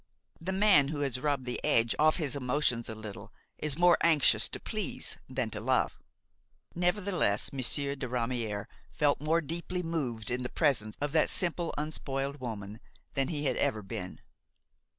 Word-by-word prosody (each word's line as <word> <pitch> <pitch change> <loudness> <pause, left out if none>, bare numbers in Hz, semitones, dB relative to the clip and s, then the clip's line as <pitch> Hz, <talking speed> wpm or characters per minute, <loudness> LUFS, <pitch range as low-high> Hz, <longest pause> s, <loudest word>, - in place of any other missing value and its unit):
The 180 +3 -3
man 190 -7 +5
who 145 0 -3
has 135 -3 -1
rubbed 140 -2 -1
the 125 - -3
edge 115 0 +3
off 155 +1 +5
his 150 -5 -1
emotions 125 -3 0
a 110 - -5
little 110 -2 -9 0.3
is 150 -1 0
more 175 0 +5
anxious 160 -4 +4
to - - -6
please - - -2
than 130 -4 -2
to 105 - -4
love. 130 +2 +1 0.7
Nevertheless 180 - +1
Monsieur 140 +2 0
de 135 -2 -4
Ramière 115 -4 -2 0.2
felt 145 -4 +1
more 160 +3 +2
deeply 170 +4 -4
moved 130 -10 -2
in 125 +1 -1
the 125 - -3
presence 130 -9 +1
of 145 0 -1
that 155 0 +3
simple, 175 -1 +1
unspoiled 140 -2 -3
woman 110 -4 -6 0.3
than 135 -1 +1
he 150 -1 -2
had 130 -3 +1
ever 110 -1 0
been. 95 -2 -6
140 Hz, 165 wpm, -30 LUFS, 120-155 Hz, 0.7 s, man